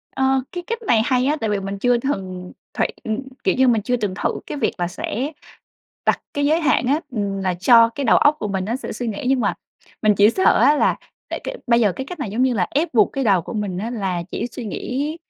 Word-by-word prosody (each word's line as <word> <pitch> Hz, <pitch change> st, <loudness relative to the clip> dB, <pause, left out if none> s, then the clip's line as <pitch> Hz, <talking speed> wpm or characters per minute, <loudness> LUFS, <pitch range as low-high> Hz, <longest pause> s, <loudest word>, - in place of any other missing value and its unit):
Ờ, 265 Hz, 0 st, +2 dB
cái 355 Hz, -1 st, -5 dB
cách 460 Hz, +1 st, -3 dB
này 225 Hz, -2 st, +4 dB
hay 255 Hz, -2 st, +2 dB
á, 295 Hz, +3 st, +2 dB
tại 220 Hz, -, 0 dB
vì 205 Hz, -1 st, 0 dB
mình 195 Hz, +1 st, -5 dB
chưa 245 Hz, +2 st, +3 dB
thừng 185 Hz, -8 st, -4 dB, 0.2 s
thị -, -, +1 dB, 0.2 s
ừm, 220 Hz, +1 st, -2 dB, 0.2 s
kiểu -, -, +2 dB
như 260 Hz, -, +4 dB
là, 250 Hz, -, +5 dB
mình 225 Hz, -2 st, +1 dB
chưa 245 Hz, +4 st, 0 dB
từng 205 Hz, -4 st, -2 dB
thử -, -, +3 dB, 0.2 s
cái -, -, -5 dB
việc -, -, 0 dB
là 175 Hz, -2 st, -1 dB
sẽ 245 Hz, -, -4 dB, 0.8 s
đặt -, -, +2 dB
cái 285 Hz, 0 st, +1 dB
giới 315 Hz, +3 st, +3 dB
hạn 275 Hz, -5 st, +2 dB
á, 290 Hz, +4 st, +2 dB
ừm, 200 Hz, -4 st, -2 dB
là 185 Hz, -1 st, 0 dB
cho 230 Hz, +6 st, +6 dB
cái 255 Hz, +5 st, -5 dB
đầu 230 Hz, -, +5 dB
óc 295 Hz, +1 st, +4 dB
của 210 Hz, -, -3 dB
mình 190 Hz, -1 st, -2 dB
nó 225 Hz, +5 st, -2 dB
sẽ 265 Hz, -, -6 dB
suy 245 Hz, -, -4 dB
nghĩ 220 Hz, +1 st, -4 dB
nhưng 265 Hz, -1 st, +2 dB
mà -, -, +1 dB, 0.5 s
mình 215 Hz, -2 st, +4 dB
chỉ 205 Hz, +2 st, +5 dB
sợ 375 Hz, +10 st, +3 dB
á, 300 Hz, -, +5 dB
là -, -, +2 dB, 0.3 s
tại -, -, -4 dB
cái -, -, -4 dB
bây 235 Hz, -1 st, +4 dB
giờ 210 Hz, -4 st, +3 dB
cái 265 Hz, +8 st, -6 dB
cách 355 Hz, +4 st, -8 dB
này, 265 Hz, -9 st, -4 dB
giống 230 Hz, +5 st, 0 dB
như 260 Hz, -1 st, +2 dB
là, 185 Hz, -5 st, +1 dB
ép 300 Hz, +1 st, -1 dB
buộc 215 Hz, -3 st, +4 dB
cái 270 Hz, -1 st, -2 dB
đầu 195 Hz, -5 st, +3 dB
của -, -, -8 dB
mình 205 Hz, -5 st, -3 dB
á, 220 Hz, +5 st, -3 dB
là 190 Hz, -7 st, -2 dB
chỉ 235 Hz, -, -3 dB
suy 245 Hz, 0 st, -8 dB
nghĩ 275 Hz, +8 st, -3 dB
235 Hz, 270 wpm, -21 LUFS, 200-270 Hz, 0.8 s, cho